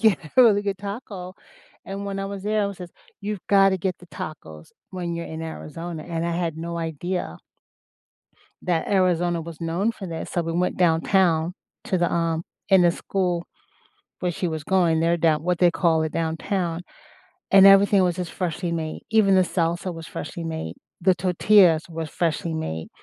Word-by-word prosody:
to 220 -5 +5
get 155 - -14
a 255 - +9
really 205 -3 +5
good 200 -2 -2
taco, 200 -3 -7 0.5
and 195 +1 -5
when 195 0 -4
I 195 - -2
was 200 -1 -6
there, 210 0 +1
it - - +1
was 200 - -8
just, 175 -1 -9 0.3
"You've 205 -2 -5
got 195 -1 +6
to 190 - 0
get 185 0 -2
the 175 - -15
tacos 80 - -9 0.2
when 175 -2 -4
you're 170 0 -4
in 160 0 -6
Arizona," 160 +1 -6
and 170 -1 -3
I 170 - -1
had 170 -2 -2
no 170 +1 -4
idea 165 - -3 1.2
that 170 -3 0
Arizona 175 -3 +2
was 160 -1 -9
known 175 +7 0
for 195 -3 -8
this, 165 -1 -6
so 175 - 0
we 165 - -3
went 180 +2 0
downtown 170 0 +2 0.3
to 185 - 0
the, 175 - +1
um 165 -1 0 0.3
in 190 -2 +6
the 175 - +5
school 180 -1 -2 0.7
where 180 -1 -1
she 175 +1 -2
was 160 -2 -4
going 170 -3 +2
there, 170 +1 +2
down 160 -2 +2
what 180 0 0
they 175 0 +5
call 165 -2 +2
it, 155 - -2
downtown, 165 +1 -2 0.7
and 195 0 +8
everything 195 0 +6
was 180 -1 +1
just 180 -3 -4
freshly 175 -1 -3
made. 160 -2 -3
Even 215 -3 +4
the 185 - +6
salsa 175 0 -1
was 165 -1 -8
freshly 165 +3 -6
made, 160 - -4 0.3
the 185 +1 +4
tortillas 180 -1 +4
were 165 -1 -5
freshly 165 0 -2
made, 80 - -4
175 Hz, 190 wpm, -24 LUFS, 165-190 Hz, 1.2 s, a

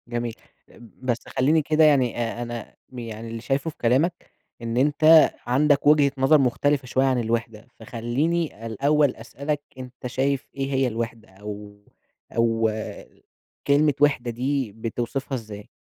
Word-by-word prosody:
جميل، 120 -1 -3 0.5
بس 120 +1 -4
خليني 150 +5 +2
كده 155 +1 +2
يعني 135 -5 +3
آآ، 120 0 -3
أنا 120 -1 -6 0.2
يعني 115 -2 -7
اللي 115 0 -6
شايفه 135 +5 -1
في 155 - -13
كلامك 140 +9 0 0.3
إن 115 0 -3
أنت 155 +4 +6 0.2
عندك 145 +3 +2
وجهة 145 -2 +5
نظر 135 +4 +5
مختلفة 140 +1 +1
شوية 130 +1 +1
عن 130 -2 +2
الوِحدة، 115 -1 -3
فخليني 120 +4 -2
الأول 140 +5 +2
أسألك، 140 +6 -4 0.2
أنت 125 0 -8
شايف 135 +2 -1
إيه 135 0 -3
هي 135 0 +2
الوِحدة 115 -1 -5
أو 105 +1 -9 0.6
أو 115 -1 +1 1.0
كلمة 145 +1 +4
وِحدة 140 -5 +2
دي 130 0 -2
بتوصفها 120 +5 -4
إزاي؟ 105 -4 -8
125 Hz, 135 wpm, -24 LUFS, 115-145 Hz, 1.0 s, أنت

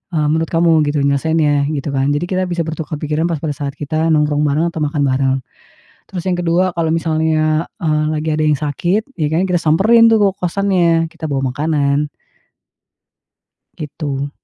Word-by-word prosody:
eee, 150 -1 +1
menurut 160 0 0
kamu 165 0 +2 0.2
gitu 145 -1 0
nyelesaiinnya?" 145 0 +1
gitu 145 -2 -3
kan. 140 +1 0
Jadi 150 - -1
kita 185 0 +1
bisa 175 -1 -1
bertukar 160 -1 -5
pikiran 155 +2 -1
pas 165 -3 -3
pada 155 - -1
saat 140 -1 -5
kita 155 +2 -2
nongkrong 150 -2 +2
bareng 160 +4 0
atau 160 - -6
makan 145 -1 -1
bareng. 135 0 +1 0.8
Terus 185 -1 -6
yang 185 - +1
kedua 175 +1 0
kalau 165 -1 0
misalnya, 160 -1 0
eee, 155 -2 0
lagi 155 +1 -3
ada 155 - 0
yang 150 -2 +2
sakit, 175 +9 -1
ya 155 - -1
kan 175 +4 +1
kita 180 -2 0
samperin 225 +9 +5
tuh 225 - +4 0.2
ke - - -43
kosannya, 175 -3 +1
kita 160 -2 -7
bawa 135 -2 -1
makanan. 145 -1 0 1.7
Gitu. 145 -2 -4
155 Hz, 175 wpm, -17 LUFS, 145-170 Hz, 1.7 s, samperin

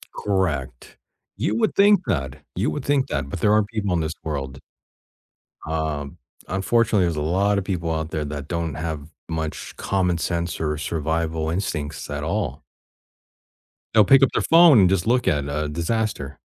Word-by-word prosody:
Correct. 80 -12 -2 0.4
You 110 - 0
would - - +1
think 200 -1 +6
that. 65 -9 -2 0.2
You - - 0
would 145 - -5
think 140 -2 +2
that, 70 -1 -3
but - - -5
there 105 -1 +4
are 105 -1 +4
people 100 -3 -2
in 85 - +1
this 80 +1 -2
world 70 -4 -4 1.1
Um, 80 -1 -3 0.3
unfortunately, 100 +1 +2
there's 85 -2 -1
a 75 - -2
lotta 100 +5 +1
people 85 -4 -2
out 80 0 -3
there 75 -1 -2
that 70 -1 -6
don't 85 -3 -2
have 80 -2 -4 0.2
much 80 -1 -4
common 90 -3 0
sense 85 0 -2
or 75 -1 -1
survival 80 +1 -2
instincts 80 -5 -3
at 75 +1 -4
all. 100 +7 -2 1.3
They'll - - +6
pick 135 -1 +6
up - - +4
their - - +1
phone 165 -7 +7
and 90 -2 +5
just 95 -1 +1
look 125 +1 +2
at 75 -1 +1
a 75 +1 -2
disaster. 85 - -2
85 Hz, 165 wpm, -23 LUFS, 75-100 Hz, 1.3 s, phone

